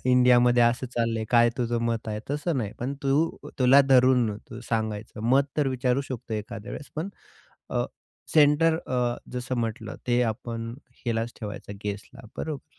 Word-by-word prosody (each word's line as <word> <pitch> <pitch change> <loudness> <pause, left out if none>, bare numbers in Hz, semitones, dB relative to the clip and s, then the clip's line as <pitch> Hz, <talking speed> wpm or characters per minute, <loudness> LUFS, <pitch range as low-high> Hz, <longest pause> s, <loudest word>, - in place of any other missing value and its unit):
इंडियामध्ये 125 -1 +5
असं 120 +2 +2
चाललंय, 115 -2 -1
काय 120 -1 +6
तुझं 120 -1 0
मत 115 -1 -1
आहे? 105 0 -3
तसं 150 +1 -1
नाही. 105 -4 -3
पण 130 +4 -2
तू 135 0 +2 0.3
अ, - - -7
तुला 130 +2 +7
धरून 125 -5 +4
तू 120 - -7
सांगायचं. 110 -1 -2
मत 135 +1 +5
तर 145 -2 +2
विचारू 130 0 +1
शकतो 115 -3 -5
एखाद्या 110 +2 -6
वेळेस 145 - -8
पण 165 +6 -2 0.6
अ, - - +1 0.5
सेंटर 155 +2 +5
अ, 125 -1 0 0.2
जसं 125 +1 -3
म्हटलं 110 -1 -3
ते 120 0 +3
आपण 115 0 -3 0.3
हिलाच 115 0 -1
ठेवायचं, 105 -1 -6
गेस्टला 100 0 -6
बरोबर? 155 -3 -6
120 Hz, 160 wpm, -26 LUFS, 115-130 Hz, 0.6 s, तुला